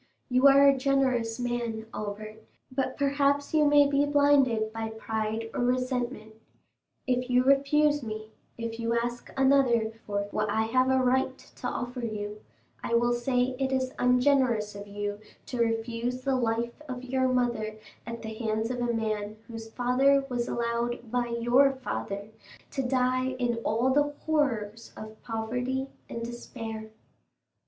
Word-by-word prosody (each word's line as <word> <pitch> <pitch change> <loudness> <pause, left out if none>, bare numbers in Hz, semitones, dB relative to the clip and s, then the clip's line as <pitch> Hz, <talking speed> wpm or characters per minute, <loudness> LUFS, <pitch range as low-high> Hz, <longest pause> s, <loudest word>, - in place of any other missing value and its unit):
You 255 +2 +5
are 275 0 +7
a 275 - +6
generous 260 -4 +1
man, 240 -2 -2
Albert, 215 +1 -6 0.3
but 265 0 -2
perhaps 280 0 +1
you 305 -1 +4
may 290 -1 +6
be 280 0 +2
blinded 280 -7 +3
by 225 0 -3
pride 220 0 -3
or - - -3
resentment; 250 -3 -1 0.7
if 250 0 0
you 250 0 +4
refuse 290 +2 +3
me, 215 -2 -6 0.3
if 230 0 -5
you 230 0 0
ask 240 +1 -3
another 265 -5 +3 0.2
for 200 -1 -1
what 215 0 -1
I 220 +2 +1
have 255 +3 +2
a 265 - +4
right 260 0 +2
to - - -8
offer 245 0 -4
you, 210 -2 -4 0.4
I 235 - 0
will 240 +1 +3
say 250 +1 0
it 270 -1 0
is 260 0 0
ungenerous 250 -4 +3
of 200 0 -8
you 205 0 -4 0.3
to 250 - -5
refuse 230 +2 -1
the 270 0 +1
life 235 +2 -1
of 255 -1 -5
your 260 0 +1
mother 240 -4 0 0.3
at 230 -1 -6
the 220 0 -5
hands 220 +1 -1
of 250 - -3
a 240 0 +1
man 215 -2 -2
whose 225 -1 -8
father 265 +4 +3
was 245 -1 -1
allowed 235 0 -2
by 245 -1 0
your 240 +4 +3
father 205 -6 -4 0.4
to 270 - -1
die 255 0 +1
in 240 -2 0
all 230 +3 +1
the 290 +1 +2
horrors 230 -8 -1
of 215 0 -10
poverty 250 +4 -2 0.2
and 230 - -5
despair." 225 -2 -7
240 Hz, 155 wpm, -28 LUFS, 225-260 Hz, 0.7 s, are